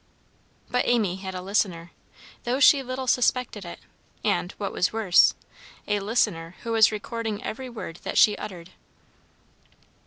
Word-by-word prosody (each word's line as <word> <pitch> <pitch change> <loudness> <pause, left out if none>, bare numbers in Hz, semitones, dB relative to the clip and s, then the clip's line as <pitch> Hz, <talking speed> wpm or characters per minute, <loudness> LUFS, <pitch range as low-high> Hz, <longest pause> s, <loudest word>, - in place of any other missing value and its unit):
But 250 - +1
Amy 210 -7 +1
had 190 -1 -7
a 180 - -5
listener, 185 -4 -1 0.5
though 250 +3 -1
she 280 0 +6
little 260 0 -5
suspected 250 -3 +1
it, 170 - -8 0.5
and, 85 +1 0
what - - -4
was 180 - 0
worse, 215 -5 +4 0.5
a 205 -1 +1
listener 180 -6 -1
who 230 - -4
was 225 -1 +5
recording 220 0 -4
every 255 +3 -5
word 215 -8 -7
that - - -5
she 210 -2 +6
uttered! 185 -4 -8
210 Hz, 145 wpm, -25 LUFS, 180-240 Hz, 0.5 s, she